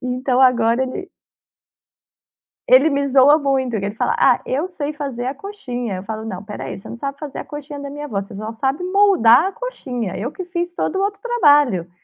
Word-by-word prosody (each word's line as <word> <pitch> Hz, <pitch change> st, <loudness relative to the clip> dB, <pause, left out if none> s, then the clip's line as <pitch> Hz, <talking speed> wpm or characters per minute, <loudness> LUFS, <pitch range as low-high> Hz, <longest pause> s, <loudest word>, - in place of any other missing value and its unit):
Então, 255 Hz, 0 st, 0 dB
agora 240 Hz, -1 st, +4 dB
ele 340 Hz, +9 st, -5 dB, 1.6 s
Ele 265 Hz, +5 st, +7 dB
me 280 Hz, 0 st, 0 dB
zoa 275 Hz, +3 st, +6 dB
muito, 270 Hz, -3 st, 0 dB
que 195 Hz, -, -4 dB
ele 205 Hz, -, -4 dB
fala: -, -, 0 dB
"Ah, -, -, +4 dB
eu 295 Hz, +8 st, -1 dB
sei 305 Hz, -4 st, -4 dB
fazer 275 Hz, -5 st, -5 dB
a 265 Hz, -, -2 dB
coxinha", 250 Hz, -, -5 dB
eu 185 Hz, -, -6 dB
falo: 220 Hz, 0 st, -5 dB
"Não, 190 Hz, -4 st, -5 dB
espera 205 Hz, 0 st, -7 dB
aí, -, -, -6 dB
você -, -, -12 dB
não 235 Hz, -, -7 dB
sabe 275 Hz, +3 st, -5 dB
fazer 300 Hz, -3 st, -7 dB
a -, -, -5 dB
coxinha 295 Hz, -1 st, -8 dB
da 280 Hz, 0 st, -6 dB
minha 295 Hz, +1 st, -7 dB
avó, 205 Hz, -8 st, -2 dB
você 200 Hz, +1 st, -10 dB
só 215 Hz, +3 st, -5 dB
sabe 270 Hz, +8 st, -2 dB
moldar 370 Hz, -, +5 dB
a 390 Hz, -, -2 dB
coxinha. 260 Hz, -, -5 dB
Eu 230 Hz, +8 st, -3 dB
que 370 Hz, -, -7 dB
fiz 350 Hz, 0 st, -3 dB
todo 380 Hz, -, -2 dB
o 385 Hz, -, +1 dB
outro 405 Hz, 0 st, -2 dB
trabalho". 290 Hz, -, +3 dB
275 Hz, 215 wpm, -20 LUFS, 235-310 Hz, 1.6 s, Ele